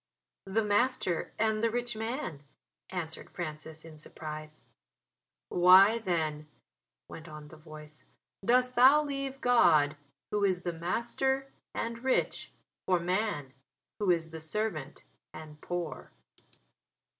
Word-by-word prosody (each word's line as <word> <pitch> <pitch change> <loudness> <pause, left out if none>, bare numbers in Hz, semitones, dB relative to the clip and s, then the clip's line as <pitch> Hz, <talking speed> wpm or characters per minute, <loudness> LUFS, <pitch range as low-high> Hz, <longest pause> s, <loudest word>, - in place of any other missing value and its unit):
"The 215 +3 +1
master 205 -4 +1
and 220 0 +1
the 230 - +3
rich 240 0 -2
man," 225 - -4 0.5
answered 170 -4 -5
Francis 155 -1 -7
in 155 -2 -12
surprise. 155 0 -8 0.9
"Why 190 +5 +7
then," 160 -7 -2 0.6
went 165 +1 -10
on 150 -1 -10
the - - -12
voice, 155 -1 -13 0.4
"dost 250 +3 +3
thou 265 +5 +7
leave 275 -2 -4
God, 155 -12 +4 0.4
Who 210 -1 0
is 185 -3 +2
the 175 - -2
Master 265 +10 -1 0.2
and 230 +1 -4
rich, 265 - 0 0.4
for 180 -2 +3
man, 175 -6 -1 0.5
who 205 -3 0
is 165 -2 +1
the 160 -1 -7
servant 160 -4 -3 0.3
and 150 -1 -11
poor?" 175 -3 -5
180 Hz, 120 wpm, -30 LUFS, 155-230 Hz, 0.9 s, Why